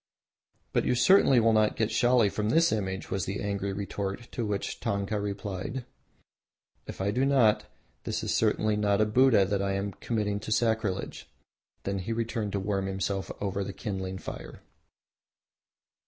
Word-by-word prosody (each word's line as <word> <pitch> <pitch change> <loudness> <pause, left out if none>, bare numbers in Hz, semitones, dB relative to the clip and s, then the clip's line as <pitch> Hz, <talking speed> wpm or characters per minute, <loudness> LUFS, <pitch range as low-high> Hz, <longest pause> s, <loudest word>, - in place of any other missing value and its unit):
"But - - +2
you - - +1
certainly 135 -2 +5
will 115 0 +4
not 110 -1 +3
get 110 0 0
Shali 120 -2 +3
from 105 0 -1
this 165 +7 +4
image!" 95 -3 -3
was 95 - -1
the 95 +2 -3
angry 100 -1 -2
retort, 100 +3 -4
to 120 - -3
which 100 -1 -3
Tanka 100 +1 -1
replied, 100 +4 -4 1.0
"If - - -8
I 100 +1 +1
do 125 +5 +1
not, 130 -6 +3 0.4
this - - -2
is - - -1
certainly 110 -1 +2
not 105 -1 +2
a 110 - +4
Buddha 125 0 +4
and 100 -1 +1
I 100 0 0
am 100 +1 -2
committing 105 -2 -2
no 105 - -7
sacrilege." 110 -3 -1 0.5
Then 100 0 -2
he 100 +5 -3
turned 110 -3 -3
to 100 - 0
warm 95 0 -1
himself 95 0 -2
over 100 0 -2
the 100 - -6
kindling 95 -2 -4
fire. - - -8
105 Hz, 165 wpm, -28 LUFS, 100-110 Hz, 1.0 s, certainly